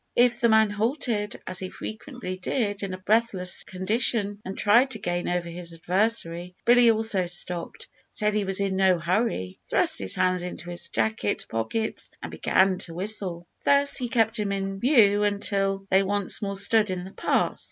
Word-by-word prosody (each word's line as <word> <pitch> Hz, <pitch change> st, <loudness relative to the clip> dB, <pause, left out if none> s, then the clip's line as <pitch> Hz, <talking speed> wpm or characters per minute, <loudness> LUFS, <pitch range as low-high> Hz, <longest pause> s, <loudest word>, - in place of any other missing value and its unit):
If 245 Hz, 0 st, +3 dB
the 235 Hz, -, +4 dB
man 220 Hz, -1 st, +4 dB
halted, 220 Hz, -1 st, -1 dB
as 185 Hz, -1 st, -3 dB
he 185 Hz, -, -5 dB
frequently 220 Hz, -3 st, -7 dB
did 205 Hz, +2 st, -2 dB
in 195 Hz, -2 st, -3 dB
a -, -, -9 dB
breathless 190 Hz, -2 st, +1 dB
condition, 205 Hz, +1 st, -1 dB
and 190 Hz, +1 st, -7 dB
tried 235 Hz, +6 st, +4 dB
to 220 Hz, -, -3 dB
gain 175 Hz, -3 st, -2 dB
over 175 Hz, -1 st, -1 dB
his 170 Hz, 0 st, -6 dB
adversary, 180 Hz, 0 st, -1 dB
Billy 240 Hz, 0 st, +6 dB
also 220 Hz, -5 st, +1 dB
stopped, 175 Hz, 0 st, -3 dB, 0.2 s
said 210 Hz, 0 st, 0 dB
he 210 Hz, -1 st, 0 dB
was 195 Hz, 0 st, 0 dB
in 195 Hz, -1 st, -1 dB
no 190 Hz, -2 st, +4 dB
hurry, 170 Hz, -, -1 dB
thrust -, -, +3 dB
his 95 Hz, -1 st, +1 dB
hands 185 Hz, -1 st, +1 dB
into 175 Hz, -1 st, -6 dB
his 175 Hz, -1 st, -3 dB
jacket 110 Hz, -4 st, -1 dB
pockets, 115 Hz, -, -2 dB
and -, -, -7 dB
began 190 Hz, -1 st, +2 dB
to 165 Hz, -, -6 dB
whistle. 185 Hz, -3 st, -1 dB, 0.2 s
Thus 280 Hz, 0 st, +4 dB
he 250 Hz, -2 st, -2 dB
kept 225 Hz, -1 st, +1 dB
him 205 Hz, -1 st, -1 dB
in 195 Hz, 0 st, -3 dB
view 215 Hz, -5 st, +4 dB
until 195 Hz, -1 st, 0 dB
they 190 Hz, -, +5 dB
once 200 Hz, 0 st, -1 dB
more 200 Hz, -1 st, -3 dB
stood 210 Hz, +1 st, +2 dB
in 180 Hz, -1 st, -3 dB
the 190 Hz, -, -9 dB
pass. -, -, 0 dB
195 Hz, 180 wpm, -25 LUFS, 180-220 Hz, 0.2 s, Billy